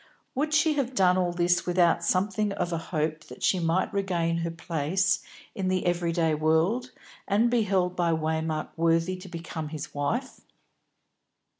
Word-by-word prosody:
Would 295 +3 -1
she 315 0 +3
have 265 -2 -1
done 180 -3 +4
all 180 -1 +1
this 175 +1 +1
without 175 -1 +3
something 200 +2 +1
of 175 -3 -2
a 165 - -1
hope 155 -1 -2
that - - -11
she 185 - +3
might 170 +2 0
regain 175 -4 0
her 170 0 -2
place 170 +3 0 0.3
in 190 -2 -2
the 185 0 0
every 175 -1 +1
day 165 -2 +1
world, 160 +11 +1 0.4
and 220 +4 +3
be 240 -1 +3
held 185 -3 +1
by 175 -2 +1
Waymark 160 0 -1
worthy 165 +2 +2
to 185 +1 -11
become 165 -2 -6
his 155 -1 -7
wife? 225 - -2
175 Hz, 165 wpm, -27 LUFS, 165-195 Hz, 0.4 s, done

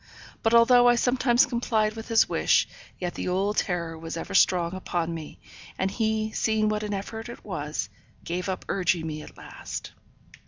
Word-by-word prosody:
But 225 +1 +3
although 245 +1 +7
I 240 - +5
sometimes 245 0 +3
complied 220 -3 0
with 225 0 -7
his 225 -1 +4
wish, - - +2 0.3
yet 175 -1 -3
the - - -4
old 195 +3 0
terror 170 -3 -1
was 165 +1 -6
ever - - -6
strong 180 -3 +3
upon 175 -3 -2
me, 160 -2 -8 0.4
and 190 0 0
he, 220 0 0
seeing 220 -1 +1
what 210 0 -1
an 210 -1 -3
effort 220 +4 -6
it 240 - -10
was, 150 -7 -3 0.4
gave 180 +2 -3
up 185 - -4
urging 175 -3 0
me 155 -1 -4
at - - -13
last. - - -8
200 Hz, 180 wpm, -26 LUFS, 175-225 Hz, 0.4 s, although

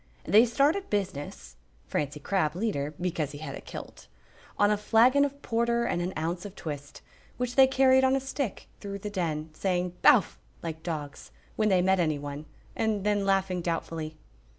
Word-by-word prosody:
They 215 +7 +5
started 295 - +1
business 145 - -4 0.3
(Francie 145 0 -2
Crabb 160 -1 0
leader, 155 -8 -2
because 165 -5 -2
he - - -7
had 145 -2 -6
a - - -7
kilt) - - -10 0.5
on 205 0 +4
a - - +4
flagon 235 +6 +4
of 280 0 -2
porter 235 +1 +1
and 175 -6 -1
an 180 +1 -2
ounce 170 +3 -2
of 205 -1 -9
twist, 145 -3 -7 0.3
which 245 0 -2
they 265 +1 +7
carried 265 0 +4
on 265 0 +4
a - - +2
stick 270 -4 -4
through 200 -1 -5
the 205 +1 -6
Den, 160 -5 -2
saying 180 0 -1
"Bowf!" 245 - +5 0.2
like 160 -1 -5
dogs, 150 -4 -6 0.3
when 215 -1 +2
they 185 -2 +3
met 190 0 +3
anyone, 145 -2 -2 0.3
and 215 -3 0
then 205 -1 +1
laughing 190 -2 +1
doubtfully. 165 -2 -3
190 Hz, 175 wpm, -28 LUFS, 155-225 Hz, 0.5 s, they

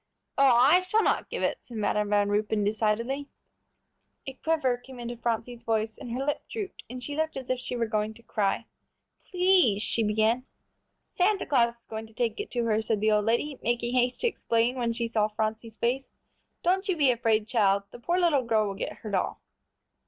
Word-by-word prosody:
"Oh, 270 -3 +5
I 275 +9 +6
shall 400 +4 +1
not - - +1
give - - -3
it," - - 0
said 235 - -10
Madam 210 0 0
Van 205 -1 +3
Ruypen, 210 0 +1
decidedly. 225 +7 -1 1.0
A 270 - -5
quiver 305 -3 0
came 250 +1 -13
into 240 0 -5
Phronsie's 235 0 -3
voice 220 -1 -1
and - - -9
her 255 +4 -2
lip 290 - -1
drooped, 415 -4 -6
and 250 +1 -7
she 290 - -4
looked 315 -1 -1
as 260 -1 -4
if 255 - 0
she 250 - -4
were 235 -1 0
going 215 0 -2
to 235 - -15
cry. 200 -4 -1 0.6
"Please," 360 - +4
she 230 - +1
began. 220 +4 +1 0.6
"Santa 390 +2 +1
Claus 235 -4 +2
is - - -25
going 220 0 -6
to 220 - -20
take 230 -3 -1
it - - -4
to 240 -1 -1
her," 220 -1 +2
said 220 -1 0
the 215 +1 +2
old 210 -1 +2
lady, 255 +5 0
making 240 +1 -1
haste 250 0 +1
to 480 - +3
explain 235 - 0
when 240 -2 0
she 235 0 -2
saw 215 -2 +1
Phronsie's 220 +1 -3
face. 260 +3 -1 0.5
"Don't 380 +3 +1
you 365 - +1
be 280 -4 +4
afraid, 225 -3 +1
child; 200 -4 +2
the - - -11
poor 345 +9 0
little 330 -6 +3
girl 220 -2 +2
will 200 - -3
get 195 - -4
her 215 - -5
doll." - - -1
235 Hz, 205 wpm, -27 LUFS, 220-270 Hz, 1.0 s, I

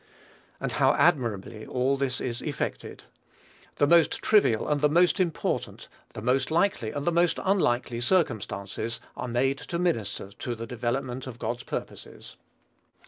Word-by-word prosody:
And - - -2
how - - +3
admirably 115 - +1
all 130 +4 0
this 135 -2 -1
is 120 -1 -3
effected! 150 -2 -4 0.7
The 145 - +3
most 165 0 +5
trivial 200 - +3
and 145 -1 +1
the 150 - +4
most 175 +5 +4
important, 175 -4 -2 0.3
the - - -6
most 130 +2 +1
likely 160 - +1
and 145 +4 -4
the 175 - +3
most 170 0 +2
unlikely 120 -11 +1
circumstances 115 - -1 0.2
are 125 - -4
made 135 +3 +1
to 170 - -4
minister 115 - -1
to 120 +4 -5
the 115 0 -6
development 125 +2 -3
of 120 -2 -7
God's 120 +1 -3
purposes. - - -7
130 Hz, 145 wpm, -27 LUFS, 120-160 Hz, 0.7 s, most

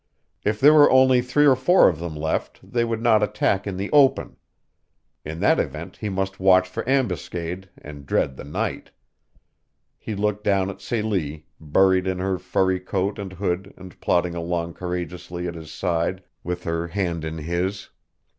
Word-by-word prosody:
If 105 0 0
there 145 +3 +7
were 150 -1 +7
only 130 -1 +5
three 125 +4 +2
or 135 -2 +6
four 175 +9 +5
of 80 -4 0
them 85 -2 -5
left 80 +1 -3
they 120 -1 -1
would 115 -1 -2
not 110 -3 +4
attack 100 -1 0
in 95 -2 -4
the 100 +2 -4
open. 140 -3 +3 0.9
In 80 +2 -6
that - - +4
event - - -4
he 105 - -4
must 95 0 -3
watch 95 -1 +5
for 90 - -5
ambuscade, 90 - -2
and 75 -1 -11
dread 65 - 0
the - - -9
night. 70 +2 -4 1.1
He 110 - -5
looked 105 +1 -1
down 100 -1 +1
at 100 - -14
Celie, 95 -10 -2
buried 95 +4 +2
in 95 -1 -1
her 95 0 -1
furry 95 +1 0
coat 95 +2 -2
and 95 -2 -6
hood 95 +1 -3
and 95 -2 -13
plodding 90 0 +1
along 85 0 -3
courageously 90 0 -5
at 85 - -4
his 80 -2 -10
side 90 +2 -1 0.2
with 90 0 -4
her 85 0 -2
hand 85 -3 -2
in 80 0 -4
his. 90 +5 -3
95 Hz, 175 wpm, -23 LUFS, 85-105 Hz, 1.1 s, there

